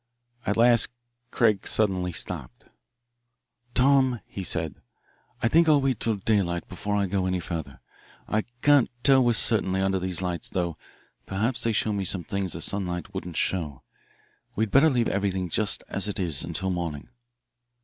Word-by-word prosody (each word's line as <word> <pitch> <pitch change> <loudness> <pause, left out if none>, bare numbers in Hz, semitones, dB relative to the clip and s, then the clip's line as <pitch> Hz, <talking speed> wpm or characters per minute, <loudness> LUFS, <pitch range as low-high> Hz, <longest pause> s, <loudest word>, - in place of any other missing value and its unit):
At 105 - +1
last 120 0 +4 0.4
Craig 110 -5 +2
suddenly 95 -4 +1
stopped. 80 -5 -6 1.1
"Tom," 130 -2 +4
he 95 - -7
said, 80 -3 -2 0.6
"I - - +4
think 165 +6 +4
I'll 150 -2 +6
wait 135 -4 0
till 115 -2 +1
daylight 95 -4 0
before 105 +2 -3
I 100 -1 +2
go 95 0 -1
any 90 0 0
further. 80 -7 -6 0.5
I 110 0 0 0.2
can't 145 -3 +5
tell 135 -2 +5
with 120 -1 +3
certainty 95 -4 +3
under 95 0 +1
these 95 -1 -2
lights, 90 -2 -3
though 85 -3 -2 0.5
perhaps 110 +6 -1
they 115 - +1
show 110 0 0
me 100 -1 -1
some 95 -1 -1
things 95 +1 -2
the 80 - -6
sunlight 95 -1 -2
wouldn't 90 -4 -5
show. 75 -8 -1 0.7
We'd 110 -1 0
better 140 +4 +6
leave 120 -4 +1
everything 95 -2 -1
just 105 +5 0
as 100 +1 -1
it 100 - -4
is 85 -7 -1
until 95 0 -2
morning." 85 -5 -4
95 Hz, 160 wpm, -26 LUFS, 90-115 Hz, 1.1 s, I'll